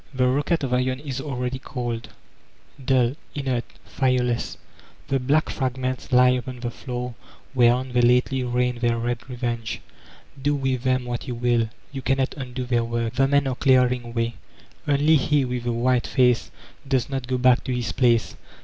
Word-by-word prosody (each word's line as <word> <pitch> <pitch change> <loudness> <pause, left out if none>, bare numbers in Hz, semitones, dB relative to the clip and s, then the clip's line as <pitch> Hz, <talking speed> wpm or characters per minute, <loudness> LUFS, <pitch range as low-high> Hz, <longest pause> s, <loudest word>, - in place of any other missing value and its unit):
The 125 0 +3
rocket 145 +5 +1
of 130 -2 -1
iron 130 +1 +1
is 135 -2 -5
already 130 -2 -3
cold; 120 -3 -4 0.7
dull, 125 -1 +3 0.2
inert, 130 -4 -1 0.2
fire 130 -2 +1
less, 120 -1 -2 0.5
the 135 - +2
black 145 +5 +1
fragments 130 0 -3
lie 125 0 +6
upon 125 0 -3
the 120 -1 -3
floor 125 0 -5 0.4
whereon 125 0 +3
they 125 - +4
lately 125 +2 +3
rained 125 0 0
their 120 -1 +1
red 120 +1 -1
revenge. 120 -2 -3 0.6
Do 145 +2 +1
with 130 -3 -1
them 130 0 +1
what 120 +2 -4
you 125 - -3
will, 120 -1 +1 0.2
you 135 - -5
cannot 135 0 0
undo 125 -2 -5
their 120 -2 +1
work. 115 0 -2
The 135 +1 +3
men 140 0 +3
are 135 - 0
clearing 125 -2 +2
way. 115 0 0 0.5
Only 145 +2 +4
he 145 0 +2
with 125 -1 -3
the 120 - +1
white 120 +1 +1
face 125 -3 +2 0.4
docs 130 -3 +1
not 135 -2 -4
go 130 0 0
back 125 0 +4
to - - -2
his 125 -1 -1
place. 120 -3 +2
125 Hz, 175 wpm, -24 LUFS, 120-130 Hz, 0.7 s, lie